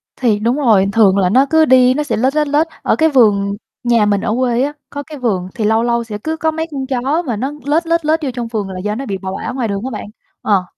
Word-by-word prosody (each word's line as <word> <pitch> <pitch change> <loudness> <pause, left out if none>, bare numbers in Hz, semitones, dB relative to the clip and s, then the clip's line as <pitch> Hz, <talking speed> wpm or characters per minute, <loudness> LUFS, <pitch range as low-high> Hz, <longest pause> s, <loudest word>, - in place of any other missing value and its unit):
Thì 220 -5 +1
đúng 235 +4 +1
rồi, 220 -9 +3
thường 200 -4 +4
là 185 -2 +2
nó 260 +6 +4
cứ 320 0 +4
đi 255 -1 +5
nó 300 +2 -1
sẽ 290 - -2
lết, 260 +5 +1
lết, 300 -1 +1
lết, 300 +3 +2
ở - - +1
cái 320 0 +3
vườn 205 -6 +3 0.3
nhà 235 -3 +3
mình 205 -1 +1
ở 215 -1 -1
quê 245 -1 +1
á, 290 +1 -2 0.2
có 285 0 -6
cái 305 -1 -10
vườn 195 -8 -1
thì 215 - -2
lâu 220 +2 +2
lâu 235 0 0
sẽ 215 -2 -6
cứ 320 0 -2
có 320 -1 0
mấy 320 +1 -3
con 270 -2 -4
chó 275 +5 0
mà 235 - -1
nó 265 +7 -3
lết, 325 +3 0
lết, 335 -2 0
lết 315 +1 +2
vô 270 - -1
trong 240 -2 -4
vườn 210 -4 -3
là 185 -1 -6
do 210 +2 -3
nó 270 +3 -5
bị 195 -2 -3
bỏ 190 0 -6
bả - - -4
ngoài 245 -4 -1
đường 200 -1 -3
á - - -2
bạn, 210 - -6 0.4
ờ, 195 -3 +1
240 Hz, 290 wpm, -16 LUFS, 210-290 Hz, 0.4 s, đi